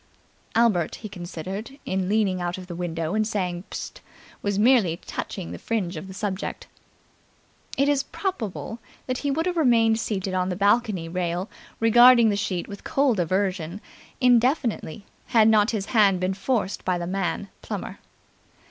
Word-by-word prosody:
'" - - -37
Albert, 215 -8 +2
he 215 - -8
considered, 190 - -7
in 185 0 -1
leaning 200 -4 +1
out 175 +1 -2
of 185 - -8
the 180 - -7
window 165 -1 -3
and 215 0 +1
saying 180 -4 -2
"Psst!" - - -6 0.4
was 200 -1 -1
merely 210 -7 +4
touching 180 0 -6
the - - -7
fringe 195 -6 -2
of 160 +4 -7
the 190 - -9
subject. 195 -1 -4 1.1
It 275 +1 +3
is 285 -1 +3
probable 235 - -4 0.3
that 255 -1 -2
he 285 - -1
would 320 +4 0
have 360 -1 -1
remained 230 -6 +4
seated 195 -4 -2
on 185 0 0
the 180 - -2
balcony 200 -3 +2
rail 175 +2 -2 0.3
regarding 235 +1 +7
the 205 - +1
sheet 190 -3 -2
with 200 0 -9
cold 270 -7 +1
aversion, 185 0 -1 0.4
indefinitely, 245 - +2 0.2
had 220 -2 +5
not 215 -1 +5
his 210 -4 -2
hand 200 -5 +5
been 185 +1 0
forced 200 0 -1
by 185 -1 0
the 175 - -4
man 195 +2 -2
Plummer. - - -6
200 Hz, 165 wpm, -25 LUFS, 180-230 Hz, 1.1 s, regarding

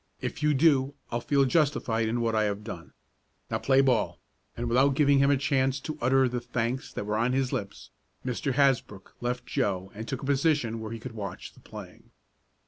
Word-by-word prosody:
If - - -5
you 150 -1 +3
do 140 -2 +3 0.2
I'll 120 0 -1
feel 140 +2 +2
justified 130 -6 +1
in 120 +1 -1
what 115 -1 0
I 110 0 +3
have 105 0 -2
done. 85 -7 -8 0.6
Now, - - 0
play 135 0 +4
ball!" 130 -4 +1 0.4
and 120 +1 -2
without 130 +4 +3
giving 140 -1 +4
him 140 0 +4
a 140 - +4
chance 135 0 +1
to 155 - -5
utter 130 +1 +4
the 125 0 -3
thanks 120 +2 -3
that - - -4
were 105 +1 -1
on 120 +3 +1
his 130 -1 0
lips, 100 0 -5 0.3
Mr. 130 +2 -1
Hasbrook 130 -8 +1
left 125 +1 -2
Joe 95 -1 -1
and 110 +2 -7
took 135 - -4
a - - -4
position 140 -5 +1
where 110 0 -6
he 115 - -4
could 125 +2 -7
watch 100 -4 -7
the - - -19
playing. - - -12
125 Hz, 205 wpm, -28 LUFS, 115-135 Hz, 0.6 s, play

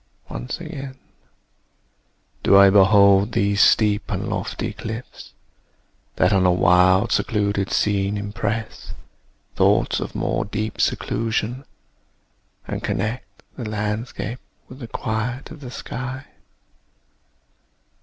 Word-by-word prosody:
Once - - -5
again 135 -1 -8 1.4
Do 100 - +5
I 100 0 +8
behold 100 +1 +5
these 100 +1 +2
steep 105 -1 +3
and - - -3
lofty - - -3
cliffs, 110 +3 -8 0.8
That - - +3
on 95 -1 +3
a 90 - +4
wild 90 +2 +4
secluded 100 -2 0
scene 100 0 +1
impress 105 +2 -4 0.6
Thoughts - - +2
of - - -6
more - - -1
deep 110 +1 -4
seclusion; 115 +3 -1 1.0
and - - -4
connect 110 +6 -4
The 120 -5 -5
landscape 110 +3 -4 0.3
with 130 - -12
the 120 - -7
quiet 115 +4 -4
of 155 - -10
the 130 -4 -9
sky. 130 +2 -6
105 Hz, 105 wpm, -22 LUFS, 100-120 Hz, 1.4 s, I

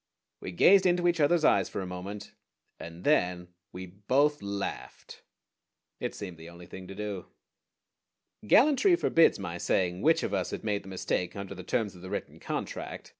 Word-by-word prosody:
We - - -6
gazed 190 - +5
into 175 0 +2
each 170 -1 +1
other's 155 +2 +3
eyes 100 -2 +3
for - - -5
a 95 - -4
moment, 90 +3 -7 0.5
and 85 +1 -9
then 90 -11 +1 0.2
we 90 +1 -7
both 130 +11 +1
laughed. 100 0 -6 0.8
It - - -4
seemed 90 -5 -7
the 80 +1 -10
only 85 0 -12
thing 95 +1 -10
to 95 - -9
do. 105 -3 -5 1.2
Gallantry 295 - +5
forbids 165 - +3
my 85 -3 -6
saying 90 0 0
which 160 +2 +3
of 105 - -3
us 95 -3 -1
had - - -6
made 105 -2 -1
the 95 - -11
mistake 90 -1 -2
under 100 -1 -6
the 95 - -8
terms 105 +1 -1
of 90 - -13
the 95 - -8
written - - -5
contract. - - -5
100 Hz, 175 wpm, -29 LUFS, 90-145 Hz, 1.2 s, gazed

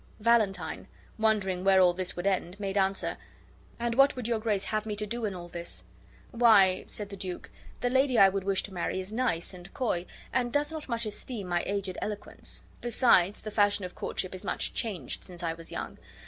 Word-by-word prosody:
Valentine, 215 -3 +1 0.3
wondering 200 -5 +1
where 195 -1 +5
all 180 -1 +6
this 185 0 0
would 175 - -4
end, 190 -1 0
made 195 -1 -3
answer, 195 -1 +1 0.6
"And 235 0 0
what 275 +3 +5
would 250 -3 -3
your 230 -2 +1
grace 215 -3 0
have 215 0 -2
me 210 - -2
to 210 +1 -2
do 235 +2 -3
in 200 -3 -2
all 175 -1 -7
this?" 170 0 -5 0.5
"Why," 210 -6 +5
said 205 -1 -4
the 200 - -7
duke, 185 -2 -6 0.3
"the 245 - +2
lady 260 -1 +3
I 195 - +9
would 195 0 -1
wish 195 0 +2
to 195 - -7
marry 180 +1 -2
is 190 +3 -5
nice 225 -8 0
and 180 +1 -11
coy 200 -9 -1 0.3
and 245 -1 +1
does 295 +3 +1
not 315 -3 -6
much 235 -1 -1
esteem 210 -1 -4
my 175 -1 +1
aged 195 -2 -2
eloquence. 210 -1 -5 0.2
Besides, 225 -5 +4
the 215 - -6
fashion 205 -2 +2
of 180 - -7
courtship 185 - -3
is 185 - -7
much - - -2
changed 210 -7 -3
since 175 -1 -9
I 165 -1 0
was 165 0 -8
young. - - -5
200 Hz, 205 wpm, -29 LUFS, 185-230 Hz, 0.6 s, I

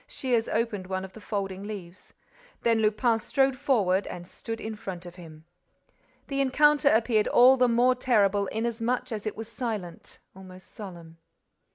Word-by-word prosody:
Shears 250 - -1
opened 215 -4 -2
one 190 0 -3
of 190 - -13
the 220 - -12
folding 195 -3 -4
leaves. 195 -3 -9 0.5
Then 230 -1 +3
Lupin 220 +2 +2
strode 270 +3 +1
forward 215 -9 +1
and 175 -1 -7
stood 225 +4 -7
in 220 0 -5
front 185 -4 -7
of 175 - -9
him. 160 -3 -13 0.8
The 275 0 -1
encounter 290 +2 +4
appeared 220 -2 +2
all 255 +2 +6
the 250 -1 +3
more 245 +2 +4
terrible 205 -6 +2
inasmuch 235 +3 -2
as 215 -1 -4
it 215 - -4
was 225 0 -6
silent, 215 -7 -6 0.2
almost 185 -1 -14
solemn. 170 -5 -10
215 Hz, 160 wpm, -27 LUFS, 190-240 Hz, 0.8 s, all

